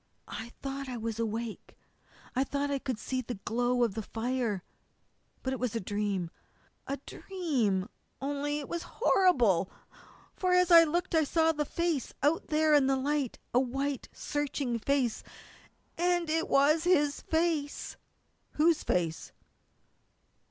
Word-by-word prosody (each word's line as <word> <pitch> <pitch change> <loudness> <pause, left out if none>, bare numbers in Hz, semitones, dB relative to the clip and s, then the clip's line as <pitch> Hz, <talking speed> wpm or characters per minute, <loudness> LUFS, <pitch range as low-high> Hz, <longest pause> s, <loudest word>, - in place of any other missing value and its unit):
"I 225 - -6
thought 275 0 -4
I 250 - -4
was 225 0 -4
awake. 225 0 -4 0.6
I 260 - +3
thought 285 +1 -2
I 280 - 0
could 260 -4 -3
see 255 +4 -2
the 245 0 -5
glow 245 +2 +1
of 230 -4 +1
the 220 - -3
fire. 225 -3 -2 0.8
But 260 - -1
it 265 - -4
was 245 -3 -2
a - - +1
dream 200 -3 -2 0.6
a 275 - -2
dream, 255 - -1 0.3
only 290 +1 -2
it 290 - -5
was 340 - -3 0.2
horrible! 245 - +4 0.7
For 365 -1 +1
as 360 -1 +4
I 335 -1 +10
looked 345 +3 -1
I 320 -1 +4
saw 320 +2 +3
a 295 0 0
face 335 -3 -1
out 300 +4 +2
there 310 0 +3
in 285 -3 +5
the 270 0 +2
light, 280 -1 -1 0.2
a 245 - +5
white, 270 +1 -2
searching 280 -4 -2
face 255 -1 0 0.8
and 350 -2 +1
it 325 +1 +1
was 300 +4 +4
his 295 -5 +3
face!" 320 -3 -1 0.6
"Whose 320 +1 +3
face?" 165 -3 -1
275 Hz, 145 wpm, -30 LUFS, 235-310 Hz, 0.8 s, I